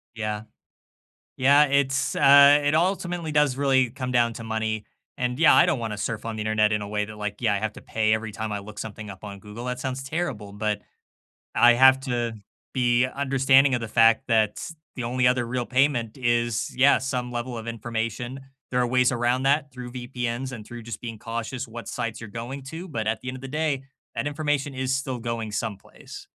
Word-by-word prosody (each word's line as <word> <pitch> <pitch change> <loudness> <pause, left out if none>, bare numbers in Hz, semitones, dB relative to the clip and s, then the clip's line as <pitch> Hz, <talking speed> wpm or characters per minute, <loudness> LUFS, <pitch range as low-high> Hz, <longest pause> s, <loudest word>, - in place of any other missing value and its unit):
Yeah. 105 -1 -3 0.9
Yeah, 140 +3 +6
it's, 140 0 +1
uh 140 +1 +8
it 145 +1 +1
ultimately 175 -1 0
does 150 -3 +3
really 135 -3 +3
come 130 0 -5
down 120 -1 +3
to 115 - -8
money, 110 -1 -2 0.3
and, 125 0 -1
yeah, 165 - +7
I - - +6
don't 140 - +1
wanna 110 -3 -4
surf 110 +1 -3
on 115 -1 -4
the - - -4
Internet 105 0 +2
in 105 -1 0
a 100 - -6
way 105 0 -1
that, 105 0 -10
like, 105 -1 -4
yeah, 110 -4 +2
I - - 0
have 110 +1 -2
to - - -12
pay 110 -1 +1
every 110 -1 -4
time 110 +1 -4
I 105 - -2
look 105 +1 -10
something 105 -1 -7
up 95 +1 -11
on 100 -1 -7
Google, 105 +4 -9
that 125 0 -3
sounds 130 0 -3
terrible, 135 -9 -4
but, 105 0 -2 0.7
I 120 0 +6
have 130 +2 +6
to 120 -3 -1 0.4
be 120 -1 +3
understanding 135 0 +3
of 120 - -1
the 115 - -4
fact 115 +3 +4
that 110 +4 +1 0.3
the 125 - -3
only 125 +1 +1
other 125 -1 +1
real 120 0 -2
payment 130 -4 +1
is, 120 -2 0
yeah, 135 +2 +5
some 125 -2 -2
level 120 0 -4
of 110 - -8
information. 115 +2 -4 0.3
There 125 - +1
are 125 - +2
ways 125 +1 +3
around 120 +1 +1
that 140 +1 +2
through 125 -2 -8
VPNs 125 0 -4
and 110 -4 -8
through 120 -1 -9
just 115 -1 -7
being 115 -2 -6
cautious 115 +3 -5
what 115 +1 -8
sites 115 -2 -4
you're 110 - -8
going 120 +5 -6
to, 170 +3 -7
but 115 -8 -3
at 110 +1 0
the 130 - -7
end 130 - -4
of 130 - -11
the 135 - -6
day, 150 -1 -1 0.3
that - - -2
information 145 -1 -1
is 130 0 -1
still 130 -1 -3
going 115 -2 -4
someplace. 105 -2 -6
120 Hz, 210 wpm, -25 LUFS, 110-135 Hz, 0.9 s, uh